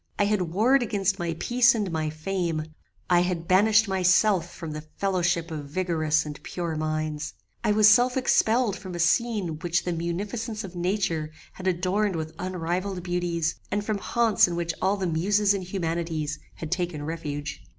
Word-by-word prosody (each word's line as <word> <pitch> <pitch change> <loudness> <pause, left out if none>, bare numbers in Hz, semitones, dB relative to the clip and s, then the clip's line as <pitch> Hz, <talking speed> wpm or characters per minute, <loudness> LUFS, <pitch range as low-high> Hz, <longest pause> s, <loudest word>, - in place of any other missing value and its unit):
I - - +3
had 210 -1 +1
warred 215 +11 +3
against 200 -4 0
my 170 -1 -2
peace 240 -1 +4
and 205 -5 -1
my 155 -1 -1
fame: 160 0 -2 0.4
I 175 -1 +4
had 175 -2 -1
banished 210 +4 +5
myself 185 -1 +3
from 165 -2 -7
the 155 0 -5 0.2
fellowship 180 -3 0
of 145 -3 -6
vigorous 160 -2 +1
and 150 -1 -7
pure 170 -3 -4
minds: 155 0 -3 0.3
I 210 - +3
was 215 0 +6
self 245 +4 +5
expelled 235 -3 +2
from 185 -1 -8
a - - -5
scene 190 -3 +1
which 170 -1 0
the 175 - -2
munificence 205 +7 -3
of 185 -2 -9
nature 175 -4 -1 0.2
had 185 - -6
adorned 185 +2 +1
with 160 0 -4
unrivalled 180 +1 -3
beauties, 175 -2 -1
and 205 +1 -1
from 215 -2 -1
haunts 225 -2 +3
in 175 - -3
which 170 -1 -2
all 195 +2 +2
the 190 - -2
muses 200 +5 +2
and 195 -2 -3
humanities 165 -4 -3 0.2
had 160 -1 -7
taken 175 -4 -2
refuge. 150 -2 -5
180 Hz, 170 wpm, -26 LUFS, 165-205 Hz, 0.4 s, was